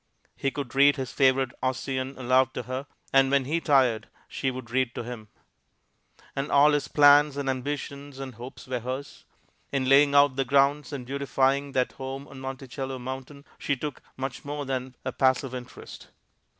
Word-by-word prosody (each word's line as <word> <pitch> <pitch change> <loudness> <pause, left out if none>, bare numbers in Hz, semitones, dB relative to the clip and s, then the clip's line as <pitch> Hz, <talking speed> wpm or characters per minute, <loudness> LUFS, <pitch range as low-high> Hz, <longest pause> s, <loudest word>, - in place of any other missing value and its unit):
He 135 - -1
could 135 -3 -6
read 140 +1 +6
his 130 -2 -4
favorite 130 -2 +3
Ossian 130 +1 -2
aloud 130 0 +2
to - - -3
her, 130 +4 -5 0.3
and 135 0 +5
when 140 -1 +2
he 165 +5 -1
tired 130 -8 +3 0.2
she 135 - -2
would 130 -3 -7
read 130 -1 0
to - - -4
him; 115 -2 -8 1.1
and 135 +1 -3
all 145 +1 +6
his 145 -1 0
plans 145 0 +6
and 140 -1 -3
ambitions 140 +1 -4
and 135 -1 -6
hopes 120 +3 -10
were 125 -1 -3
hers. 130 +4 -6 0.5
In 135 -2 0
laying 140 +1 +5
out 140 -2 +5
the 135 - +2
grounds 140 +3 +2
and 135 -4 -5
beautifying 140 +1 0
that 125 -1 +1
home 135 +1 -7
on 135 - -11
Monticello 135 0 -5
mountain, 130 +3 -7
she 145 - 0
took 145 +2 -6 0.2
much 130 -1 -5
more 145 0 -4
than 130 -1 -4
a 130 - -1
passive 130 0 +1
interest. 125 -1 -9
135 Hz, 175 wpm, -27 LUFS, 130-140 Hz, 1.1 s, read